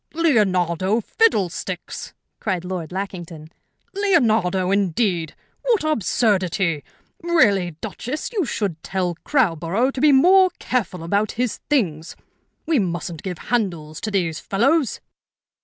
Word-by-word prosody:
"Leonardo 195 - +2
fiddlesticks!" 195 - -1 0.2
cried 185 -4 -2
Lord 180 -3 -5
Lackington. 175 -5 -6 0.4
"Leonardo, 225 - +2
indeed! 185 -4 0 0.3
What 465 -7 +1
absurdity! 190 - +1 0.4
Really, 205 - +2
Duchess, 250 - -5
you 410 -5 +1
should 195 - -3
tell 185 -2 -2
Crowborough 210 - +1
to 265 - -5
be 300 0 +6
more 370 +7 +6
careful 190 -9 -2
about 200 +5 0
his 245 -1 -2
things. 170 - 0 0.5
We 315 -4 +2
mustn't 175 -3 -3
give 180 -3 -5 0.2
handles 170 -9 -1
to 220 - -2
these 175 -6 -1
fellows." 270 +7 +1
195 Hz, 110 wpm, -22 LUFS, 175-255 Hz, 0.5 s, be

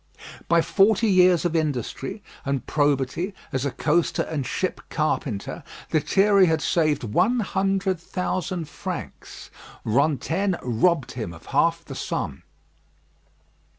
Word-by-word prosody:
By 170 0 +4
forty 210 +2 +3
years 180 -3 +5
of 170 -1 0
industry 150 - -2 0.2
and 140 -3 -2
probity 145 +6 0 0.2
as 130 +1 -1
a - - -2
coaster 165 +4 +1
and 145 -5 -3
ship 185 - -2
carpenter, 140 -9 -2 0.3
Lethierry 190 +5 +4
had 160 -1 +2
saved 155 -3 +1
one 215 - +2
hundred 195 -2 0
thousand 180 -1 -3
francs. 145 - -7 0.3
Rantaine 160 - +1
robbed 130 +5 +1
him 110 -9 -5
of 80 - -14
half - - +2
the - - -8
sum. - - -4
160 Hz, 120 wpm, -24 LUFS, 140-185 Hz, 0.3 s, years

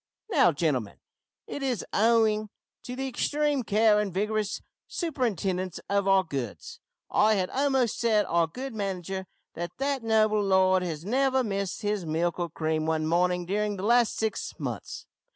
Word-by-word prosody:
Now, 275 - +5
gentlemen, 140 -9 -1 0.5
it 285 - -6
is 255 -5 -1
owing 215 -1 +3 0.3
to 250 - -7
the 270 +1 -3
extreme 290 +2 0
care 215 -1 +3
and 210 -2 -1
vigorous 210 +2 -1 0.3
superintendence 205 - -2
of 200 -1 +1
our 195 -1 +5
goods 135 - -6 0.3
I 215 +1 +4
had 185 -2 -1
almost 265 -4 +1
said 220 -3 +3
our 170 -1 +2
good 255 +9 -6
manager 190 -2 -4 0.3
that 175 +1 -6
that 275 0 -1
noble 215 -1 +3
lord 190 -1 +3
has 165 -2 -4
never 265 +3 +2
missed 200 -3 -3
his 205 -2 -1
milk 165 +2 -1
or 175 -1 -1
cream 155 0 -1
one 160 -1 0
morning 180 +2 +1
during 205 +2 -1
the 185 - -6
last 235 0 +3
six 220 -1 -2
months. - - -5
205 Hz, 155 wpm, -27 LUFS, 180-235 Hz, 0.5 s, Now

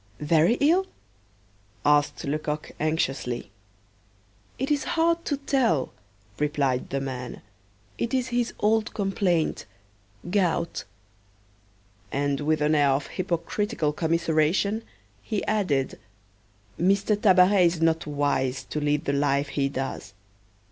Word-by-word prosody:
"Very 160 +8 +3
ill?" 340 +8 +3 1.0
asked 145 0 +3
Lecoq 150 +1 -3
anxiously. 135 -8 -1 1.1
"It 265 +3 -2
is 290 -2 +1
hard 335 +1 +2
to 285 - -1
tell," 260 - +1 0.5
replied 145 -4 0
the 135 - -1
man: 130 -2 -6 0.6
"it 235 - -1
is 255 -1 0
his 240 -1 0
old 220 +1 +1
complaint 190 - 0 0.6
gout." 180 -4 0 1.3
And 140 0 0
with 155 +1 +1
an 150 +1 +3
air 145 -2 +4
of 135 +1 +1
hypocritical 175 -1 -1
commiseration, 165 +6 +1 0.4
he 215 -4 -3
added: 170 -11 0 0.8
"M. 190 +3 +4
Tabaret 195 -2 +4
is 170 -1 -1
not 165 -1 +1
wise 140 -3 0
to 150 - -4
lead 150 0 0
the 140 - 0
life 140 0 +1
he 140 -1 0
does. 135 -7 -5
160 Hz, 115 wpm, -26 LUFS, 145-205 Hz, 1.3 s, air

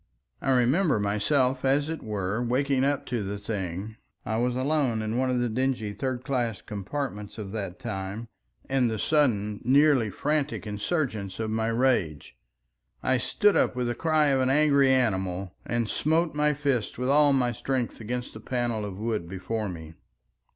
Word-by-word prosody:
I - - -2
remember 130 - +3
myself 125 +6 +1
as 140 +2 +2
it 160 -1 -4
were 105 +1 -2
waking 130 +2 +1
up 140 0 0
to 120 -3 -2
the 100 +1 -4
thing—I 100 +2 -5
was 120 +1 +1
alone 130 -4 +1
in 110 +1 -2
one 130 +1 +1
of 125 - +1
the 120 0 +1
dingy 120 -2 -1
"third 130 +1 -3
class" 120 -6 -1
compartments 105 0 -5
of 100 -3 -6
that 100 -4 -4
time—and 115 +3 -4
the 110 - -2
sudden 105 -7 +1
nearly 135 -3 +4
frantic 150 +4 -1
insurgence 105 - -2
of 110 -1 -2
my 110 0 0
rage. 115 - 0 0.7
I 130 0 +2
stood 205 +9 +2
up - - +2
with 125 -1 -1
the 120 - 0
cry 155 +2 +2
of 135 -1 +2
an 130 - +2
angry 140 -1 +4
animal, 95 -7 0
and 120 -1 0
smote 160 +7 +1
my 150 0 +2
fist 140 -6 -1
with 125 +2 -1
all 145 +1 +5
my 125 -3 +2
strength 125 0 -3
against 125 +3 -4
the - - -9
panel 120 -4 -2
of 100 -2 -5
wood 105 -5 -2
before 105 +3 -3
me. 80 -2 -8
120 Hz, 165 wpm, -27 LUFS, 105-135 Hz, 0.7 s, all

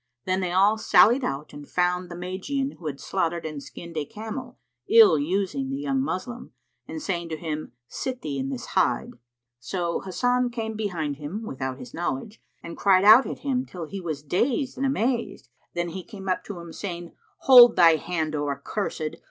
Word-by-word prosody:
Then 185 0 +1
they 180 -2 -2
all 200 +4 +4
sallied 240 +4 +5
out 140 - -4
and 145 0 -10
found 180 0 0
the 175 - -7
Magian 190 +11 -3
who 165 - -6
had 140 -2 -5
slaughtered 170 -3 -2
and 155 -2 -5
skinned 170 +3 -10
a 150 - 0
camel, 225 - -7 0.3
ill 445 - +7
using 195 - -1
the 275 - -3
young 275 -1 -1
Moslem, 245 0 -5 0.3
and 320 - -6
saying 175 - -3
to 160 - -4
him, 155 -5 -5
"Sit 255 - -5
thee 140 -3 -3
in 135 +1 -2
this 130 -3 -5
hide." - - +1 0.5
So 170 +6 -2
Hasan 245 +6 0
came 225 -2 -4
behind 170 -9 -3
him, 155 +10 -6
without 130 -5 -4
his 125 -3 -11
knowledge, 175 +5 -4 0.2
and 170 - -7
cried 190 -1 +4
out 220 +6 +8
at - - -6
him 260 -2 +1
till 180 -9 -7
he 195 +5 -7
was 155 -5 -4
dazed 245 - 0
and 275 - 0
amazed. 240 - -1 0.3
Then 175 0 -1
he 185 +2 -6
came 195 -2 -10
up 185 - 0
to 200 -4 -7
him, 170 -1 -10
saying, 175 -4 -6 0.3
"Hold 245 -3 +9
thy 165 -3 +6
hand, 160 -1 -3
O 145 -1 -1
accursed! 155 +2 -3
185 Hz, 190 wpm, -25 LUFS, 160-235 Hz, 0.5 s, Hold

